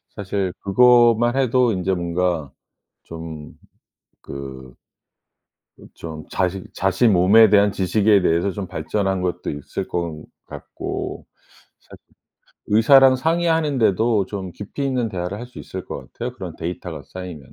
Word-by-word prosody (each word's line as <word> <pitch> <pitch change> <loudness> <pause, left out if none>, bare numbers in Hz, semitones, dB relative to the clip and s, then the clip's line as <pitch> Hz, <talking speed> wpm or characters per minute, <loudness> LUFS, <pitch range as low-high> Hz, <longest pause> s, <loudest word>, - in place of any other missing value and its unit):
사실 95 -2 -3
그거만 120 +3 +4
해도 125 -2 +2
인제 95 +1 -1
뭔가 85 -4 -1 0.5
좀 80 -2 -9 0.7
그 65 -2 -9 1.0
어 - - -15
좀 80 -2 -8
자식 95 0 -1
자신 95 +4 +2
몸에 100 +5 +6
대한 100 0 +5
지식에 100 +1 +2
대해서 85 +3 +1
좀 95 0 -5
발전한 95 +1 -2
것도 90 -1 -3
있을 75 -1 -5
건 85 -3 -4 0.2
같고 - - -6 0.5
사실 - - -16 0.7
의사랑 130 +5 +6
상의하는 160 0 +1
데도 110 -1 +2
좀 95 -2 -6
깊이 105 +10 -6
있는 125 -4 0
대화를 95 0 -4
할 120 - -7
수 125 - -13
있을 95 -1 -7
것 - - -9
같아요 - - -5
그런 - - -8
데이터가 85 +1 -6
쌓이면은. 90 -7 -9
95 Hz, 265 characters per minute, -21 LUFS, 90-115 Hz, 1.0 s, 몸에